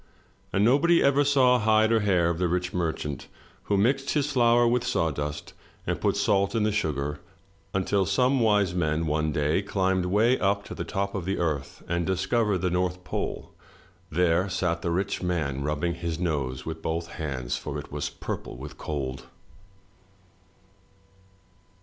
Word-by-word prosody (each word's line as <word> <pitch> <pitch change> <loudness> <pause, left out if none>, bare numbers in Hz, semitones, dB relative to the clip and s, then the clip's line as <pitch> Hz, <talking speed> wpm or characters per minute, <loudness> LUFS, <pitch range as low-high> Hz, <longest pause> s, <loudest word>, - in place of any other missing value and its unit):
And 100 +2 +2
nobody 165 +8 +4
ever 140 +1 +4
saw 130 -3 +4
hide 110 0 +3
or 115 - +4
hair 90 -5 +2
of 85 - -4
the 90 - +2
rich 90 +1 -1
merchant 80 -5 -3 0.4
who 100 - +1
mixed 135 +7 +1
his 150 0 +1
flour 120 -2 +4
with 120 +1 +2
sawdust 75 - -2 0.3
and - - -2
put - - +1
salt 100 +2 +2
in 110 - +2
the 105 - +2
sugar, 75 -6 -2 0.5
until 95 0 +1
some 130 +1 +2
wise 105 -5 +3
men 80 -2 0
one 75 0 0
day 75 +5 +1
climbed 95 -2 0
way 110 +7 +3
up 100 +1 +1
to - - -7
the - - -4
top 100 0 -2
of 95 -4 -3
the 95 +1 -1
Earth 75 -5 -3
and 85 0 -1
discovered 95 +2 +1
the 90 -1 0
North 90 0 -1
Pole. - - -4 0.6
There 90 +3 +2
sat 90 -2 -1
the 85 - -2
rich 95 +4 -1
man 80 -7 -1
rubbing 75 +4 -1
his 85 -2 -4
nose 70 -7 -2
with 80 0 -5
both 80 +1 -2
hands, 70 -7 -4
for - - -5
it - - -8
was - - -3
purple - - -6
with 70 +3 -9
cold. 70 -3 -4
90 Hz, 165 wpm, -26 LUFS, 80-105 Hz, 0.6 s, nobody